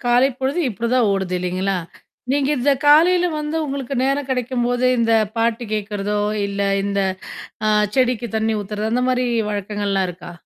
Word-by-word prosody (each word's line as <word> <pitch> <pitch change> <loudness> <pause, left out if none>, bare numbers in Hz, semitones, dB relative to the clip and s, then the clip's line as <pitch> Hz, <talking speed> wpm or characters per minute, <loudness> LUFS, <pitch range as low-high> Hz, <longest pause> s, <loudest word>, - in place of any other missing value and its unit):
காலை 245 +2 +4
பொழுது 270 +6 -1
இப்படிதான் 235 +1 +1
ஓடுது 190 -2 -1
இல்லைங்களா? 185 +2 -1 0.5
நீங்க 280 0 +1
இந்த 280 +3 +3
காலையில 345 +4 +6
வந்து 300 +1 -3
உங்களுக்கு 275 -1 -4
நேரம் 275 0 0
கிடைக்கும்போது 250 0 0
இந்த 230 -1 +2 0.2
பாட்டு 230 +1 0
கேட்கறதோ, 205 0 -2 0.3
இல்ல 200 0 -4 0.2
இந்த 200 0 0 0.7
அ - - +3 0.2
செடிக்கு 245 -2 +1
தண்ணி 220 0 0
ஊத்துறதோ 210 +2 -3
அந்த 250 +1 +1
மாரி 250 0 +1 0.2
வழக்கங்கள்லாம் 200 -1 -1
இருக்கா? 175 - -11
235 Hz, 145 wpm, -20 LUFS, 205-265 Hz, 0.7 s, காலையில